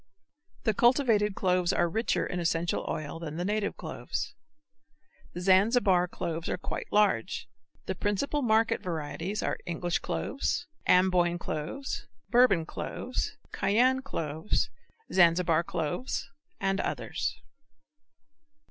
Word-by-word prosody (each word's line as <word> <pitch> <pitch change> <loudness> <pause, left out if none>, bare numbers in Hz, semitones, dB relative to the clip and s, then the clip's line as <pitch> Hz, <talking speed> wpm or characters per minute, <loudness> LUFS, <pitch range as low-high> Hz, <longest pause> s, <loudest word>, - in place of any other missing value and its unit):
The 220 - +2
cultivated 230 -4 +3
cloves 180 -2 +2
are 175 - +2
richer 220 +8 0
in 180 - -3
essential 170 0 0
oil 155 +1 -4
than 160 -2 -6
the 175 - -2
native 210 +1 -1
cloves. - - -4 1.0
The 175 - -4
Zanzibar 190 -1 +4
cloves 165 -1 -4
are - - -1
quite - - -5
large. 205 - +2 0.4
The 190 - -1
principal 205 +10 -1
market 225 -2 +3
varieties 170 +4 -3
are - - -1
English 175 0 -1
cloves, 315 +5 -2 0.2
Amboyne 180 -1 +4
cloves, 175 - -4 0.2
Bourbon 235 -9 +5
cloves, - - -4
Cayenne 255 +5 +3
cloves, 160 - -2 0.4
Zanzibar 170 -2 +4
cloves, 165 - -3 0.3
and 195 0 0
others. - - -2
185 Hz, 110 wpm, -29 LUFS, 170-220 Hz, 1.0 s, Bourbon